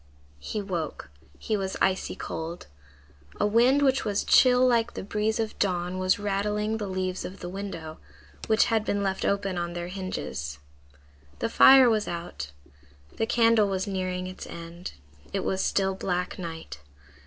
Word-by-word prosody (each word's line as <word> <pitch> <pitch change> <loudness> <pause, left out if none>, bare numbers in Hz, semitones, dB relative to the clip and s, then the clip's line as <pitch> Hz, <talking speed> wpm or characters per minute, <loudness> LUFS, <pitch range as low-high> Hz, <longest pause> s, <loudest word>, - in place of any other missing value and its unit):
He 210 - -4
woke. 165 - -4 0.3
He 215 - -2
was 190 -2 -3
icy 190 0 +1
cold. 165 +2 -6 0.7
A - - +3
wind 245 +7 +4
which 265 -2 +3
was 205 -1 0
chill 250 0 +6
like 235 -2 +2
the - - -4
breeze 210 +3 -1
of 220 -1 -3
dawn 180 -1 0
was 185 0 +2
rattling 210 +2 -1
the 210 -2 -4
leaves 185 -1 -2
of 190 - -7
the - - -6
window, 180 -5 -6 0.5
which 220 0 +4
had 225 -2 +1
been 205 -2 -1
left 190 -1 -1
open 195 -2 0
on 170 0 -3
their 175 0 -4
hinges. 75 - -5 0.8
The 230 - -1
fire 265 +2 +8
was 220 -3 +2
out. 170 - -5 0.7
The 225 - 0
candle 230 -3 +4
was 190 -1 -1
nearing 185 -2 -2
its 185 0 -8
end. 170 +1 -8 0.4
It 195 - 0
was 190 0 0
still 195 -1 +1
black 180 -1 -2
night. 165 - -7
195 Hz, 160 wpm, -27 LUFS, 180-215 Hz, 0.8 s, fire